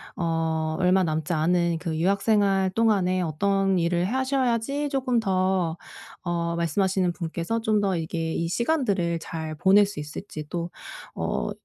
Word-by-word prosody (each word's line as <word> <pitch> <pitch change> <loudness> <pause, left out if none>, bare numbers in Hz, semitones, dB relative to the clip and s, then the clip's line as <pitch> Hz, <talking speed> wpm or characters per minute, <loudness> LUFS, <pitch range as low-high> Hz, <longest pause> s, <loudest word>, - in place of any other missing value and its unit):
어 160 -2 -1
얼마 185 +1 +4
남지 160 +1 -1
않은 170 +1 +1
그 160 -2 -3
유학 195 +4 +1
생활 195 -3 +3
동안에 190 -4 +2
어떤 195 +3 +1
일을 175 +1 +1
하셔야지 265 +3 0
쪼끔 260 -4 +1
더 185 -4 0 0.5
어 170 -1 -1
말씀하시는 185 +2 +1
분께서 170 +6 -3
좀 215 -2 +2
더 190 -3 +1
이게 165 0 -3
이 165 - -1
시간들을 200 - 0
잘 160 -2 -5
보낼 195 +5 +5
수 195 -7 -7
있을지 150 +1 -7
또 170 0 -3 0.5
어 - - -2
180 Hz, 275 characters per minute, -25 LUFS, 165-205 Hz, 0.5 s, 보낼